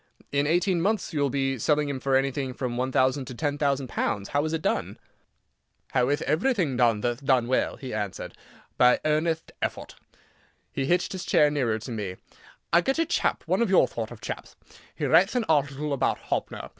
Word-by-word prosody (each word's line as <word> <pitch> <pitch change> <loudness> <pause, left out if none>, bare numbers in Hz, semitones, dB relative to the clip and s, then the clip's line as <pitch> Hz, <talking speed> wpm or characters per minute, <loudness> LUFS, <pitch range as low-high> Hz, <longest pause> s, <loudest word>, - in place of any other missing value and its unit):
In 140 +1 +1
eighteen 175 +2 +2
months 200 -1 0
you 150 - -1
will 140 - +2
be 135 -1 -1
selling 150 +5 +2
him 140 -2 -3
for 135 0 +1
anything 135 -1 0
from 125 -3 -3
one 130 +2 -1
thousand 130 +1 +2
to 125 - -8
ten 145 +1 -2
thousand 140 -2 0
pounds. 100 -4 -2
How 145 +1 +1
is 155 - -2
it 160 -1 -2
done?" - - -1 0.9
"How 125 -1 +2
ith 145 +2 0
everything 180 - +1
done 115 -4 +3
that'th 120 +4 -2
done 130 -3 +3
well?" 130 - +1
he 130 -3 -7
answered. 105 -3 -4 0.5
"By 125 0 +6
earnetht 160 +1 0
effort." - - -3 0.8
He 135 - -2
hitched 175 +2 +1
his 185 -2 -5
chair 150 -1 +4
nearer 125 -7 0
to 115 +3 -8
me, 105 -5 -4 0.6
"I 170 - +6
get 270 - 0
a 330 - +2
chap—one 325 - 0
of 235 - +2
your 190 - +5
thort 115 -1 -5
of 120 -3 -11
chapth—he - - -8
writ'th 185 +8 +4
an 245 - +2
article 145 -1 +1
about 140 - +1
Hoppner. - - -4
140 Hz, 195 wpm, -26 LUFS, 125-160 Hz, 0.9 s, By